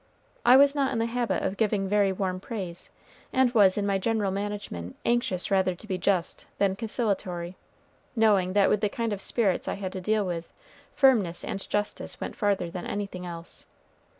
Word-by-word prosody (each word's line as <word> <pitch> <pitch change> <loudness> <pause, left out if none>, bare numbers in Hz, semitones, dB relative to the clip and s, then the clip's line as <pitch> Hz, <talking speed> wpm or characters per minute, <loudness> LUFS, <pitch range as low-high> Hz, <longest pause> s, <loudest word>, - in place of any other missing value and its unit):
I 255 - +8
was 280 0 +6
not 280 -2 +1
in - - -1
the 225 - +1
habit 230 -5 -1
of 195 - -2
giving 210 -3 +1
very 200 0 +3
warm 185 -1 -2
praise, 185 -5 -5 0.4
and 260 -2 +3
was 200 -4 +5
in 205 - 0
my 200 -1 +1
general 215 -1 0
management 200 - -5
anxious 235 -6 0
rather 190 -2 +2
to 185 - -14
be 190 -3 -3
just 185 -2 0
than 195 -1 +2
conciliatory, 195 -6 -2 0.6
knowing 205 -5 +3
that 200 -1 +4
with 210 - +2
the 210 - +2
kind 230 0 -2
of 200 - -5
spirits 200 -5 0
I - - -1
had 190 -2 -5
to 190 - -5
deal 215 +2 +1
with, 170 -2 -4 0.4
firmness 210 -11 +3
and 195 - -5
justice 205 0 -2
went - - -5
farther 195 -5 0
than 175 0 -5
anything 195 -3 -4
else. 170 -1 -9
200 Hz, 185 wpm, -27 LUFS, 185-220 Hz, 0.6 s, I